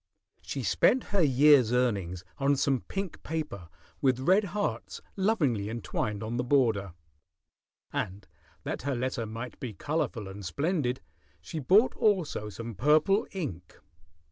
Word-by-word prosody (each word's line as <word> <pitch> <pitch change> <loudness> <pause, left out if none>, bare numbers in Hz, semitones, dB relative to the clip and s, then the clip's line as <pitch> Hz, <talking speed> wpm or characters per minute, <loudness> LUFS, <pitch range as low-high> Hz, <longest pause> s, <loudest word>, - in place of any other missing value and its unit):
She - - -5
spent 255 - +3
her 200 - +4
year's 140 -4 +5
earnings 100 -8 0 0.2
on 140 +1 +3
some 135 -1 +1
pink 195 -3 -4
paper 150 - -5 0.3
with 130 -2 +2
red 190 +9 +4
hearts 205 +2 -3 0.2
lovingly 150 - +1
entwined 110 -2 -3
on 115 +2 -3
the 125 - 0
border, 115 -8 +2 1.0
and 95 +2 -4 0.4
that - - -4
her 140 +1 -1
letter 125 -2 -2
might 115 +3 -7
be 120 -4 -5
colorful 140 -6 -2
and 100 +1 -8
splendid, 140 - -1 0.4
she 160 - -6
bought 195 - +4
also 180 - +1
some 115 +2 -7
purple 155 - +3
ink. 120 - -6
130 Hz, 135 wpm, -29 LUFS, 110-160 Hz, 1.0 s, year's